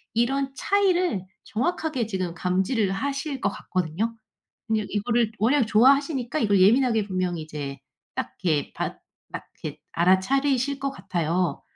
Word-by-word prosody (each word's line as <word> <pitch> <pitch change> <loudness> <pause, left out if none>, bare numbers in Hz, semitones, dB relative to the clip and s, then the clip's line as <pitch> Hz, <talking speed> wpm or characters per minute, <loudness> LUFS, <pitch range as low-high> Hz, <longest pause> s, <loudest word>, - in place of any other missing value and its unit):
이런 270 +4 +1
차이를 365 - +1 0.2
정확하게 265 -1 -1
지금 185 -5 -2
감지를 190 +4 0
하실 275 +6 -2
것 200 - +1
같거든요. 185 +4 -2 0.5
그냥 220 -2 0
이거를 230 +1 +1
왜냐면 245 +3 +3
좋아하시니까 265 +4 +3
이걸 205 -5 +3
예민하게 225 +1 +4
분명히 185 -3 -2
이제 145 -3 -6 0.3
딱 - - -4
이렇게 155 -5 +1
받 - - -4 0.3
딱 - - -5 0.2
이렇게 - - -6
알아차리실 260 +10 +2
것 275 - -1
같아요. 180 - -1
220 Hz, 325 characters per minute, -25 LUFS, 185-270 Hz, 0.5 s, 예민하게